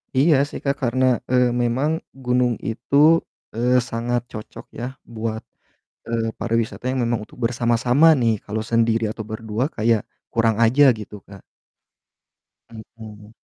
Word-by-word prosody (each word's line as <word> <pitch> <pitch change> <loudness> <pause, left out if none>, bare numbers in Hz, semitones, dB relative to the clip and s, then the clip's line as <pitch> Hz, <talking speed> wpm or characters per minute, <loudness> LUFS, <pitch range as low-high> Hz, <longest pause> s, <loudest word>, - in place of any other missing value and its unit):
Iya 150 +3 +4
sih - - -7
Kak, 140 - +1
karena, 130 +2 +1 0.3
eee, 125 -1 +4 0.2
memang 130 +6 0 0.3
gunung 125 0 +2 0.2
itu, 115 +5 -4 0.6
eee, 120 +2 +1 0.2
sangat 120 +1 -1
cocok 110 -2 -9
ya 120 - -3 0.3
buat, 110 0 -3 0.6
eee, 115 -1 -1
pariwisata 115 -2 -2
yang 130 0 -1
memang 120 -1 0
untuk - - -17
bersama-sama 120 +4 +3
nih. 115 -2 +3
Kalau 110 +1 -3
sendiri 115 0 +2
atau 110 - -7
berdua 110 +2 -2
kayak, 110 -1 +2 0.3
kurang 115 -1 +2
aja 125 +6 +4 0.2
gitu 105 0 -9
Kak. 100 -2 -13 1.3
Hmm. 110 -2 -12
115 Hz, 135 wpm, -22 LUFS, 110-125 Hz, 1.3 s, Iya